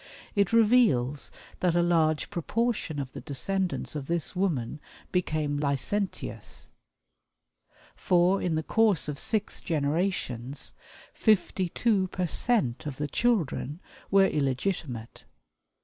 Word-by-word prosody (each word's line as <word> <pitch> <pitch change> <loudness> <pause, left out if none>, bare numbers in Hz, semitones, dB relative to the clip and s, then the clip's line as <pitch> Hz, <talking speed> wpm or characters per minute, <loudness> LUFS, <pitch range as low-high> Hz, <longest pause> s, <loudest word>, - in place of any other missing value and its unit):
It 200 -3 +2
reveals 210 - +3 0.3
that 175 -2 +2
a 175 - +4
large 160 -3 +2
proportion 210 -2 -1
of 135 -2 -5
the - - -7
descendants 180 +7 -2
of 145 -3 -5
this 170 0 -2
woman 155 -9 -1 0.3
became 155 -5 0
licentious, 150 +8 -3 1.2
for, 180 +1 +3
in 170 -3 0
the 160 - -1
course 215 -3 +2
of 150 -2 -4
six 215 -2 -2
generations, 145 -5 -2 0.4
fifty 190 -4 +2
two 200 -1 +1
percent 180 - +1
of 135 -3 -5
the 150 - -2
children 165 - 0 0.3
were 195 0 +6
illegitimate. 135 - -2
170 Hz, 110 wpm, -28 LUFS, 145-195 Hz, 1.2 s, were